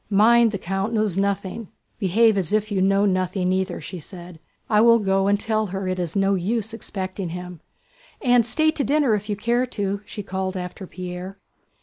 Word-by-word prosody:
"Mind, 225 +3 +5
the 210 - -3
count 195 +4 -3
knows 215 -5 0
nothing. 200 +2 -2 0.3
Behave 220 +3 +3
as 185 -5 0
if 215 0 0
you 195 -2 +1
know 195 +1 +3
nothing 185 -1 0
either," 190 -1 -1
she 180 +4 -7
said. 175 0 -11 0.3
"And 210 - +2
I - - +6
will 230 0 +7
go 195 -2 +1
and 200 0 +2
tell 215 0 0
her 190 0 -4
it 185 0 -2
is 175 -1 -3
no 195 0 +2
use 215 +4 -1
expecting 190 -4 -5
him! 180 0 -7 0.6
And 245 -3 +4
stay 310 +7 +2
to 305 -3 -2
dinner 285 -5 +2
if 210 0 -2
you 205 - 0
care 235 +4 0
to!" 200 -4 -3
she 205 - -6
called 190 0 -3
after 180 +1 -6
Pierre. 180 +2 -7
195 Hz, 200 wpm, -23 LUFS, 185-220 Hz, 0.6 s, will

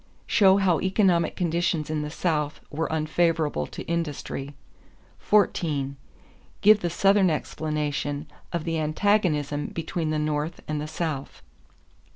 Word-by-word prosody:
Show 195 -2 +5
how 185 -5 +3
economic 190 -3 +2
conditions 170 -2 0
in 155 -1 -1
the 150 - -4
South 150 -2 -1
were 160 +2 -2
unfavorable 155 - +1
to - - -8
industry. 150 -4 -4 0.6
14. 155 -9 +1 0.7
Give 215 +1 +7
the 175 - -1
Southern 195 +2 +4
explanation 150 -2 -2 0.3
of 170 -3 -2
the 165 -1 -1
antagonism 155 -3 +1
between 165 0 -3
the 155 - 0
North 150 +2 -2
and 150 -1 -2
the 150 - -4
South. 155 - -4
160 Hz, 125 wpm, -25 LUFS, 150-175 Hz, 0.7 s, Give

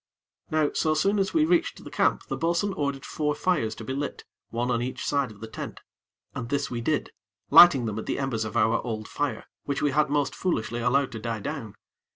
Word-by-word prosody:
Now 155 -2 +2
so 155 -1 +1
soon 200 +6 +2
as 195 - +1
we 315 -1 +3
reached 335 0 +1
the - - -10
camp, - - +2
the - - -4
bo'sun 170 +4 0
ordered 140 -3 -2
four 150 -1 -1
fires 150 -10 0
to 110 - -8
be 130 - -4
lit 140 +1 -4 0.2
one 120 +2 -1
on 120 -1 +1
each 125 +1 -4
side 140 -3 +1
of 105 -1 -15
the 115 - -6
tent, - - -7 0.5
and 115 -2 -5
this 140 0 -1
we 120 -1 -3
did, 150 +4 -1 0.4
lighting 150 -9 +9
them 110 -1 -3
at - - -7
the - - -1
embers 135 -5 -1
of 110 +1 -3
our 110 +1 +3
old 110 -3 -4
fire, 145 -1 -3 0.2
which 140 -1 -2
we 145 - +3
had 150 +1 +2
most 145 -1 +1
foolishly 120 -10 -1
allowed 125 +3 +2
to 115 - -6
die 115 0 -3
down. 115 -3 -5
140 Hz, 220 wpm, -26 LUFS, 115-155 Hz, 0.5 s, lighting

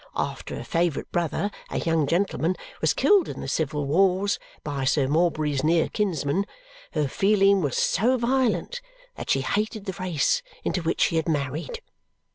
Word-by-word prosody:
After - - -3
her - - -6
favourite 170 -3 -1
brother, 175 +4 -1 0.2
a - - -3
young 165 -3 +1
gentleman, 180 +1 +1 0.3
was - - +3
killed 405 -5 +3
in - - -6
the - - -5
civil 145 0 -1
wars 190 +6 +2 0.2
(by 140 -2 -3
Sir 135 +1 +2
Morbury's 155 -2 +1
near 165 +1 +3
kinsman), 190 -2 0 0.5
her 150 -3 +1
feeling 195 +4 +3
was 145 -6 -1
so 250 +5 +2
violent 260 - 0 0.3
that - - -8
she 135 - +3
hated 210 +8 -2
the 190 -3 -4
race 185 - +1 0.2
into 180 - -1
which 165 0 -1
she 165 - +3
had 160 +1 0
married. 150 - -2
170 Hz, 160 wpm, -25 LUFS, 150-200 Hz, 0.5 s, was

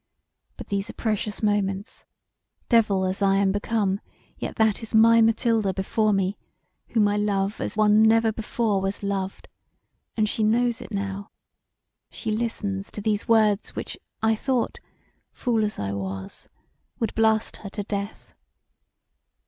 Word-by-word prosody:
But - - -9
these 200 0 -2
are - - -7
precious 215 -1 -2
moments; 205 +2 -1 0.6
devil 210 -5 +3
as 185 +2 -2
I 195 -1 +4
am 195 -1 +3
become, 205 -1 0 0.4
yet - - -5
that 220 -2 +2
is 225 0 -4
my 230 +1 +7
Mathilda 225 -3 +2
before 215 +3 +1
me 195 0 0 0.5
whom 215 -3 +2
I 205 0 +1
love 205 0 0
as - - -3
one 210 0 +5
was 220 - +6
never 225 0 +4
before 210 -3 -1
loved: 195 -1 -3 0.7
and 215 -1 +3
she 220 - -2
knows 235 +2 +2
it - - -10
now; 200 0 -4 0.8
she 220 - -4
listens 210 -3 -2
to 210 - -7
these 210 0 -1
words 215 -3 +3
which - - -5 0.3
I 220 0 +4
thought, 255 +2 -1 0.5
fool 230 -4 0
as 210 0 -2
I 100 -1 -3
was, 95 -1 -5 0.5
would 225 -3 -2
blast 220 0 +2
her 200 - -8
to 205 +1 -4
death. 200 +1 -5
210 Hz, 150 wpm, -25 LUFS, 195-225 Hz, 0.8 s, my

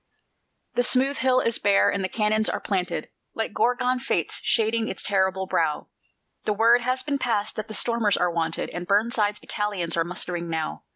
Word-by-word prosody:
The - - +2
smooth 265 +3 +2
hill 255 +1 +3
is 230 - 0
bare, 200 -1 +3
and 200 - -2
the 185 - -1
cannons 215 +1 +1
are - - -2
planted, 185 -4 -2 0.3
Like 225 -2 -3
Gorgon 250 +2 +1
fates 260 - -1
shading 225 0 +1
its - - -4
terrible 190 -1 +1
brow; 160 -5 -1 0.6
The 210 - +1
word 230 +3 +4
has 255 +2 -1
been 285 -2 -2
passed 220 -4 -1
that 215 0 -4
the 215 - -6
stormers 230 -4 +1
are 180 -1 +1
wanted, 165 -1 -2
And 175 0 -6
Burnside's 210 0 +1
battalions 200 -5 -2
are 165 - +2
mustering 175 0 -3
now. 160 -1 -4
210 Hz, 180 wpm, -25 LUFS, 185-235 Hz, 0.6 s, word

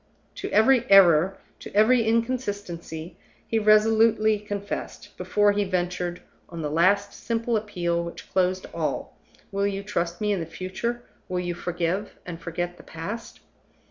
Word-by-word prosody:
To - - -5
every 240 +3 +4
error, 190 -1 +6 0.2
to - - -9
every 230 +4 +5
inconsistency, 205 -8 -2 0.3
he 225 - +1
resolutely 215 0 +4
confessed, 205 -1 -6
before 205 0 +2
he 205 0 +1
ventured 180 -2 -2 0.3
on 170 -2 -6
the 150 - -2
last 200 +5 +3
simple 230 0 -2
appeal 175 -5 -1
which 170 - -8
closed 185 0 +1
all, - - -3 0.4
"Will 200 0 0
you 200 0 -3
trust 175 -4 -2
me 210 -1 0
in 200 - 0
the 165 - -4
future? 190 +8 -4 0.3
Will 180 -1 -1
you 175 -1 -2
forgive 175 +3 -2
and 170 -2 -7
forget 175 +1 -4
the - - -14
past?" 205 +8 -7
195 Hz, 145 wpm, -25 LUFS, 175-215 Hz, 0.4 s, error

